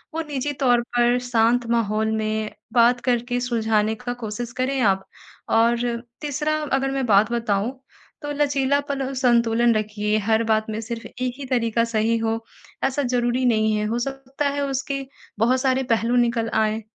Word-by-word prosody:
वो 325 Hz, -, 0 dB
निजी 290 Hz, 0 st, -2 dB
तौर 245 Hz, -2 st, +4 dB, 0.2 s
पर 240 Hz, 0 st, +4 dB
शांत 235 Hz, +1 st, +3 dB
माहौल 220 Hz, -1 st, +1 dB
में 215 Hz, 0 st, -2 dB, 0.2 s
बात 245 Hz, +1 st, +5 dB
करके 245 Hz, 0 st, 0 dB
सुलझाने 220 Hz, -3 st, +1 dB
का 245 Hz, +2 st, -5 dB
कोशिश 225 Hz, +2 st, -4 dB
करें 260 Hz, +1 st, 0 dB
आप। 190 Hz, -3 st, +2 dB, 0.4 s
और 230 Hz, +1 st, +3 dB, 0.4 s
तीसरा 300 Hz, +1 st, -1 dB, 0.2 s
अगर 270 Hz, 0 st, +1 dB
मैं 270 Hz, -1 st, -1 dB
बात 210 Hz, +1 st, +4 dB
बताऊँ 235 Hz, +2 st, -1 dB, 0.4 s
तो 290 Hz, -, -3 dB
लचीलापन 280 Hz, -1 st, 0 dB
संतुलन 235 Hz, -2 st, +3 dB
रखिए, 210 Hz, 0 st, 0 dB
हर 220 Hz, +2 st, +1 dB
बात 220 Hz, -1 st, +1 dB
में 215 Hz, 0 st, -3 dB
सिर्फ़ 230 Hz, +1 st, -6 dB
1 250 Hz, 0 st, -4 dB
ही 280 Hz, -, -6 dB
तरीका 230 Hz, -2 st, +1 dB
सही 230 Hz, 0 st, +1 dB
हो 225 Hz, 0 st, -2 dB, 0.4 s
ऐसा 270 Hz, +2 st, +1 dB
ज़रूरी 245 Hz, 0 st, 0 dB
नहीं 220 Hz, -2 st, +2 dB
है, 210 Hz, 0 st, -1 dB
हो 230 Hz, +3 st, -1 dB
सकता 270 Hz, +2 st, -3 dB
है 285 Hz, 0 st, -2 dB
उसके 275 Hz, 0 st, -3 dB, 0.3 s
बहुत 255 Hz, +4 st, +3 dB
सारे 265 Hz, -1 st, +1 dB
पहलू 230 Hz, +2 st, +2 dB
निकल 235 Hz, -2 st, +1 dB
आएँ 220 Hz, 0 st, +1 dB
240 Hz, 165 wpm, -23 LUFS, 220-260 Hz, 0.4 s, बात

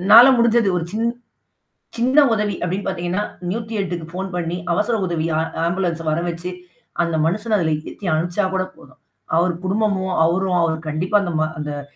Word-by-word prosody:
உன்னால 205 Hz, +6 st, +9 dB
முடிஞ்சது 235 Hz, -2 st, +4 dB
ஒரு 170 Hz, -, -1 dB
சின் 225 Hz, +2 st, 0 dB, 0.9 s
சின்ன 260 Hz, +5 st, +5 dB
உதவி 210 Hz, -3 st, 0 dB
அப்பிடின்னு 185 Hz, +3 st, -2 dB
பார்த்தீங்கன்னா, 180 Hz, +1 st, -1 dB, 0.3 s
108க்கு 200 Hz, -6 st, -3 dB
போன் 190 Hz, 0 st, -4 dB
பண்ணி, 175 Hz, 0 st, -2 dB, 0.2 s
அவசர 210 Hz, +6 st, +1 dB
உதவி 165 Hz, -2 st, -1 dB
ஆ -, -, +2 dB, 0.3 s
ஆம்புலன்ஸ 170 Hz, -2 st, -1 dB
வரவச்சு, 170 Hz, +2 st, -2 dB, 0.5 s
அந்த 170 Hz, -1 st, 0 dB
மனுஷன 215 Hz, +5 st, 0 dB
அதில 160 Hz, -4 st, +1 dB, 0.2 s
ஏத்தி 205 Hz, -, -10 dB
அனுப்பிச்சா 175 Hz, +5 st, 0 dB
கூட 190 Hz, -1 st, +1 dB
போதும். 130 Hz, -, -18 dB, 0.4 s
அவரு 175 Hz, +2 st, +3 dB
குடும்பமும், 190 Hz, -1 st, 0 dB
அவரும் 170 Hz, -2 st, +1 dB
கண்டிப்பா 180 Hz, +7 st, +1 dB
அந்த 180 Hz, -3 st, -2 dB
ம 150 Hz, -2 st, -3 dB
180 Hz, 145 wpm, -21 LUFS, 170-205 Hz, 0.9 s, உன்னால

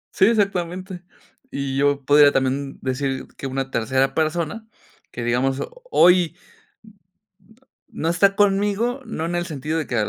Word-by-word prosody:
Sí, 190 Hz, -, +5 dB
exactamente. 185 Hz, -4 st, -1 dB, 0.5 s
Y 140 Hz, -, -4 dB
yo 140 Hz, 0 st, +1 dB
podría 145 Hz, 0 st, +6 dB
también 135 Hz, +1 st, -1 dB
decir 135 Hz, 0 st, -2 dB
que 135 Hz, -, -6 dB
una 135 Hz, 0 st, -3 dB
tercera 130 Hz, +4 st, 0 dB
persona, 170 Hz, +7 st, -2 dB, 0.4 s
que 120 Hz, -, -6 dB
digamos 130 Hz, +3 st, 0 dB, 0.3 s
hoy 175 Hz, -, +4 dB, 1.6 s
n -, -, -8 dB
no 165 Hz, -, +2 dB
está 195 Hz, +3 st, +3 dB
conmigo, 205 Hz, +5 st, +1 dB
no 165 Hz, -8 st, -4 dB
en 170 Hz, -, -3 dB
el 175 Hz, 0 st, -2 dB
sentido 155 Hz, 0 st, -3 dB
de 155 Hz, -, -4 dB
que, 120 Hz, -, -3 dB
155 Hz, 145 wpm, -22 LUFS, 135-185 Hz, 1.6 s, podría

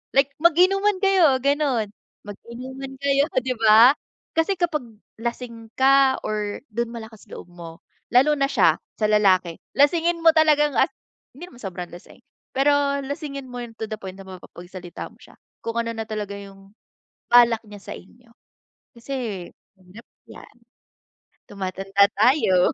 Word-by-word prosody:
Like 275 Hz, +1 st, +3 dB
mag-inuman 375 Hz, +5 st, +4 dB
kayo 370 Hz, -8 st, +4 dB
ganun, 280 Hz, -6 st, +1 dB, 0.4 s
mag-inuman 255 Hz, +6 st, -9 dB
kayo 280 Hz, 0 st, +2 dB, 0.2 s
'di 255 Hz, +1 st, -3 dB
ba, 225 Hz, +3 st, +7 dB, 0.5 s
kasi 325 Hz, +5 st, +2 dB
kapag 325 Hz, -6 st, -1 dB, 0.4 s
lasing 235 Hz, -1 st, -5 dB
ka 270 Hz, 0 st, +4 dB
or 210 Hz, -1 st, -3 dB
dun 235 Hz, +2 st, -2 dB
malakas 220 Hz, -2 st, -10 dB
loob -, -, -10 dB
mo, 170 Hz, -2 st, -11 dB, 0.3 s
lalo 270 Hz, +5 st, +6 dB
na 275 Hz, -1 st, +1 dB
siya, -, -, +3 dB, 0.2 s
sa 215 Hz, -, 0 dB
lalaki, 185 Hz, -5 st, +3 dB, 0.2 s
lasingin 335 Hz, +4 st, +2 dB
mo 325 Hz, -, +8 dB
talagang 300 Hz, -2 st, +4 dB
as -, -, +4 dB, 0.5 s
hindi 350 Hz, +6 st, -10 dB
naman 245 Hz, -, -16 dB
sobrang 180 Hz, -3 st, -6 dB
lasing, 175 Hz, -, -14 dB, 0.3 s
pero 280 Hz, +1 st, +2 dB
lasingin 280 Hz, -1 st, -6 dB
mo 245 Hz, 0 st, -7 dB
yung 235 Hz, -1 st, -9 dB
to 220 Hz, -1 st, -5 dB
the 215 Hz, -, -3 dB
point 190 Hz, -1 st, -8 dB
na 195 Hz, -, -10 dB
mapapagsalita 180 Hz, -1 st, -10 dB
mo -, -, -22 dB
siya, -, -, -18 dB, 0.3 s
kung 230 Hz, -, -3 dB
ano 230 Hz, 0 st, -1 dB
na 225 Hz, -1 st, -5 dB
talaga 210 Hz, -2 st, -5 dB
yung 195 Hz, 0 st, -14 dB, 0.6 s
balak 235 Hz, -2 st, +6 dB
niya 205 Hz, -1 st, -12 dB
sa -, -, -9 dB
inyo, 235 Hz, +5 st, -19 dB, 0.7 s
kasi 235 Hz, -7 st, -5 dB, 0.3 s
mahirap 190 Hz, +4 st, -16 dB, 0.2 s
yan -, -, -14 dB, 0.9 s
tumatanda 195 Hz, 0 st, +1 dB
tayo. 205 Hz, -5 st, +3 dB
235 Hz, 145 wpm, -23 LUFS, 200-280 Hz, 0.9 s, mo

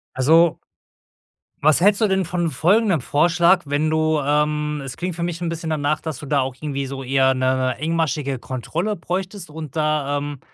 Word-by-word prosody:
Also 160 Hz, +5 st, +4 dB, 1.0 s
was 155 Hz, +2 st, +4 dB
hältst 200 Hz, +2 st, +4 dB
du 220 Hz, -, +3 dB
denn 190 Hz, -1 st, +1 dB
von 175 Hz, -1 st, -2 dB
folgendem 185 Hz, -, +2 dB
Vorschlag: 175 Hz, +6 st, +3 dB
Wenn 145 Hz, +2 st, 0 dB
du 155 Hz, 0 st, +1 dB
ähm, 150 Hz, +1 st, 0 dB
es 130 Hz, -, -7 dB
klingt 175 Hz, +1 st, -4 dB
für 170 Hz, -, -2 dB
mich 170 Hz, 0 st, -3 dB
'n 170 Hz, -, -1 dB
bisschen 165 Hz, -1 st, -4 dB
danach, 150 Hz, -1 st, 0 dB
dass 160 Hz, -5 st, -6 dB
du 145 Hz, -, -9 dB
auch 130 Hz, -1 st, -2 dB
irgendwie 140 Hz, -1 st, -4 dB
so 135 Hz, 0 st, -6 dB
eher 130 Hz, 0 st, +3 dB
'ne 130 Hz, 0 st, 0 dB
engmaschige 155 Hz, -3 st, -1 dB
Kontrolle 160 Hz, -, -3 dB
bräuchtest 185 Hz, +1 st, -5 dB
und 155 Hz, -3 st, -8 dB
da, 150 Hz, -2 st, 0 dB
ähm, 145 Hz, -1 st, -5 dB
155 Hz, 175 wpm, -21 LUFS, 140-170 Hz, 1.0 s, Also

